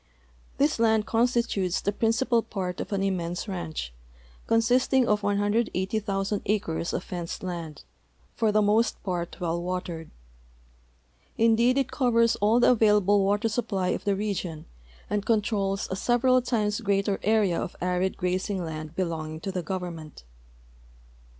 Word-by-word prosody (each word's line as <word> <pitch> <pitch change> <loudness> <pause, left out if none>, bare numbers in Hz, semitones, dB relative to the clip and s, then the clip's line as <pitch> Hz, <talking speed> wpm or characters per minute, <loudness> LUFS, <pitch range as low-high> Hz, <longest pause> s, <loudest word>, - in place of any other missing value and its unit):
This 290 -3 +2
land 220 -2 +3
constitutes 230 -6 +1
the 200 - -1
principal 230 +3 +1
part 185 -5 -4
of - - -7
an 195 -1 0
immense 180 -1 -2
ranch, 165 - -5 0.5
consisting 250 +3 +3
of 210 0 +2
180,000 205 -1 0
acres 180 -5 -1
of 180 - -3
fenced 175 -1 -6
land, 170 -5 -6 0.5
for 220 -2 +1
the 215 0 +3
most 215 +3 +2
}>art 175 -2 -3
well 170 -1 -1
watered. 175 -2 -4 1.3
Indeed 230 +3 +4
it 270 -2 0
covers 230 -3 +3
all 215 +4 +3
the 245 - +5
available 210 -3 +4
water 205 +3 +1
siij) 230 +1 -2
})1}' 190 -4 0
of - - -5
the 200 -1 +2
region 190 -6 -3 0.4
and 205 -1 -1
controls 205 -3 0
a - - 0
several 250 +4 +3
times 215 -3 -1
greater 200 -1 0
area 210 -5 +2
ol' - - -3
arid 180 +1 -1
grazing 185 0 -1
land 155 0 -6
l)elonging 160 -3 -3
to 195 - -2
the 185 -1 -2
government. 170 - -6
200 Hz, 140 wpm, -26 LUFS, 180-225 Hz, 1.3 s, the